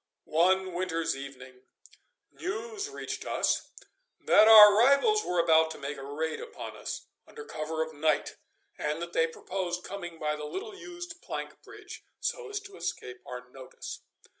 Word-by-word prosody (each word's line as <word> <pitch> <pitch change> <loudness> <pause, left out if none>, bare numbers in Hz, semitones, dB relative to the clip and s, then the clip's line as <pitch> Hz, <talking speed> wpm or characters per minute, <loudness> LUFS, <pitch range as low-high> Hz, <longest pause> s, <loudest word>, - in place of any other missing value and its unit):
One 185 +3 +2
winter's 170 -4 -1
evening 130 -2 -10 0.7
news 425 +2 -4
reached 420 - -5
us - - 0 0.5
that 215 +1 +6
our 210 -2 +11
rivals 280 - +5
were 180 - -2
about 160 -1 +5
to - - -7
make 140 +1 -5
a 135 - -8
raid 155 +3 -3
upon 470 - -8
us - - -6 0.2
under 445 -1 -10
cover 160 - -3
of 160 0 -9
night, 155 +1 0 0.4
and 150 +1 -1
that 170 0 -6
they 165 - +3
proposed 180 +1 -4
coming 175 -4 -7
by 150 -1 -1
the 150 0 -6
little 405 - -6
used 350 -2 -9
plank - - -6
bridge, - - -11 0.2
so 485 -3 -3
as 415 0 -3
to 400 0 -12
escape 125 0 -5
our 125 0 -7
notice. 130 -1 -9
175 Hz, 160 wpm, -29 LUFS, -, 0.7 s, our